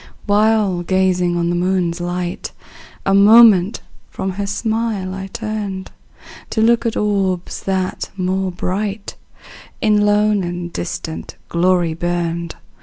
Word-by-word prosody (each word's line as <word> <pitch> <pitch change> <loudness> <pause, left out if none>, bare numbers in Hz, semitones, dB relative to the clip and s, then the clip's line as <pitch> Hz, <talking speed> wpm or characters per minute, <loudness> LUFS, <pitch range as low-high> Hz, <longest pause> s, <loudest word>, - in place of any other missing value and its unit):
While 210 -3 +2
gazing 180 -1 +1
on 170 0 0
the - - 0
moon's 175 -1 0
light, 175 0 -4 0.5
A 195 - +2
moment 205 -1 +6 0.3
from 190 - -3
her 200 +2 -4
smile 215 -2 -2
I 195 0 -6
turned, 210 -3 -5 0.6
To 220 - 0
look 235 +1 +3
at 225 - -2
orbs, 195 -4 -1
that, 190 -1 -2
more 190 0 -1
bright, 200 +3 -3 0.6
In 210 -1 +3
lone 205 -1 +2
and 175 0 -5
distant 125 - -5
glory 175 -1 +2
burned. 170 0 -2
190 Hz, 120 wpm, -18 LUFS, 175-210 Hz, 0.6 s, moment